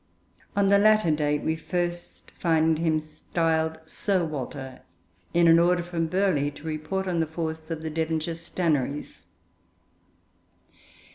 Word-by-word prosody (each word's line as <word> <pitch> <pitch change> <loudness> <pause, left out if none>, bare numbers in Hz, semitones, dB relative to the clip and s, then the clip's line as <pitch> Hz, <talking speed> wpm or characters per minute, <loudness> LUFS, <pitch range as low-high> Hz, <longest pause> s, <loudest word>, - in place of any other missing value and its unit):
On 200 -1 +3
the 200 0 +6
latter 215 -4 +4
date 150 -1 0
we 160 - 0
find 165 -1 -1
him 165 -1 +2
first 155 0 -8
styled 160 -1 0
Sir 185 +2 0
Walter, 130 -3 -6 0.5
in 170 0 +4
an 165 0 +7
order 175 0 +3
from 170 -1 -2
Burghley 180 -5 +1
to 145 0 -13
report 160 +5 -3
on 175 -2 0
the 160 - +1
force 160 0 -5
of 160 -1 -4
the 160 - -3
Devonshire 160 +1 -1
Stannaries. 160 -4 -2
160 Hz, 135 wpm, -26 LUFS, 155-175 Hz, 0.5 s, an